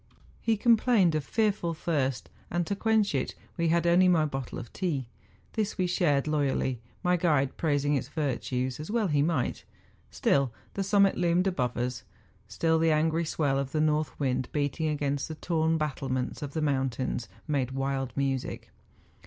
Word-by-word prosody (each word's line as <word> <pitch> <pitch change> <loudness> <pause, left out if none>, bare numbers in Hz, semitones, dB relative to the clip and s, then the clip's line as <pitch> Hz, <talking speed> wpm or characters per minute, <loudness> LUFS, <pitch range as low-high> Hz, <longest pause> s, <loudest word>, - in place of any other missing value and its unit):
lie 225 - +4
complained 220 -5 +4
of 155 -1 0
fearful 200 -1 0
thirst, 135 -7 -1 0.2
and 175 0 0
to 200 - -2
quench 220 -2 +2
it 135 - -1 0.2
we 170 -1 0
had 170 +1 +2
only 175 +2 +5
my 165 -4 +4
bottle 135 -4 -4
of 115 - -8
tea; 160 -9 -1 0.5
this 215 -2 -1
we 185 - +1
shared 160 -6 +2
loyally, 135 -5 0 0.2
my 180 0 +3
guide 150 -6 +1
praising 145 -2 +1
its 130 -3 -1
virtues, 130 -4 -2
as 150 - -6
well 225 0 +1
he 145 -2 +2
might. 155 -4 0 0.5
Still 135 -3 +1 0.2
the 200 - -2
summit 200 0 +3
loomed 175 +1 +2
above 130 -11 -1
us; 125 0 -2 0.5
still 160 +9 +1
the 165 0 +3
angry 160 +2 +2
swell 145 -4 0
of 140 0 -4
the 155 - +1
north 155 -2 +1
wind 130 -3 0
beating 145 +2 -1
against 145 -2 -1
the 160 - -6
torn 160 0 +1
battlements 135 -4 -2
of 145 -1 -5
the 160 - -1
mountains, 130 -4 -1 0.2
made 140 -5 0
wild 135 -1 -2
music. 135 -2 -2
150 Hz, 170 wpm, -28 LUFS, 135-170 Hz, 0.5 s, only